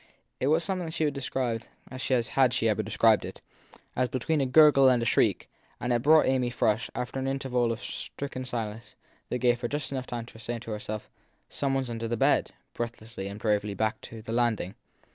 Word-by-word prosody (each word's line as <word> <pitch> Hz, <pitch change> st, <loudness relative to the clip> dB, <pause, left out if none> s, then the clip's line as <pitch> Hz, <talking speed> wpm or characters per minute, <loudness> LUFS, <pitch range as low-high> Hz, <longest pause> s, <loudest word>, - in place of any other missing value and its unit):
It 130 Hz, -, 0 dB
was 160 Hz, +3 st, +3 dB
something 180 Hz, -1 st, -2 dB
she 160 Hz, 0 st, -1 dB
would 150 Hz, -, +2 dB
have 140 Hz, -, -4 dB
described, 120 Hz, -4 st, -2 dB, 0.2 s
had 130 Hz, 0 st, +1 dB
she 115 Hz, -2 st, +2 dB
ever 110 Hz, 0 st, +2 dB
described 110 Hz, +1 st, +3 dB
it, -, -, -8 dB, 0.5 s
as 125 Hz, 0 st, +1 dB
between 145 Hz, +4 st, 0 dB
a 135 Hz, -, +1 dB
gurgle 135 Hz, -1 st, +7 dB
and 125 Hz, -1 st, +4 dB
a 115 Hz, -, -1 dB
shriek, -, -, +2 dB, 0.3 s
and 125 Hz, 0 st, 0 dB
it 120 Hz, -, +1 dB
brought 155 Hz, +4 st, +6 dB
Amy 130 Hz, -2 st, +2 dB
Frush, 115 Hz, -1 st, 0 dB
after 125 Hz, +2 st, -3 dB
an 135 Hz, -, -2 dB
interval 130 Hz, -3 st, 0 dB
of 115 Hz, +1 st, -5 dB
stricken 135 Hz, -2 st, -5 dB
stillness 110 Hz, -3 st, -5 dB, 0.3 s
that 125 Hz, -, -1 dB
gave 120 Hz, -1 st, +2 dB
her 120 Hz, -, -1 dB
just 145 Hz, +2 st, -3 dB, 0.2 s
time 120 Hz, -1 st, -4 dB
to 115 Hz, -, -14 dB
say 120 Hz, +1 st, -4 dB
to 115 Hz, -1 st, -8 dB
herself 105 Hz, 0 st, -5 dB, 0.4 s
Some 135 Hz, -1 st, -1 dB
one 135 Hz, -1 st, 0 dB
under 115 Hz, -1 st, -4 dB
her 120 Hz, -, -1 dB
bed! -, -, +3 dB, 0.2 s
breathlessly 115 Hz, -4 st, -5 dB
and 100 Hz, +1 st, -7 dB
bravely 105 Hz, -2 st, 0 dB
back 110 Hz, +2 st, -1 dB
to 110 Hz, -1 st, -10 dB
the 115 Hz, -, -5 dB
landing. 115 Hz, -6 st, 0 dB
120 Hz, 200 wpm, -28 LUFS, 115-135 Hz, 0.5 s, gurgle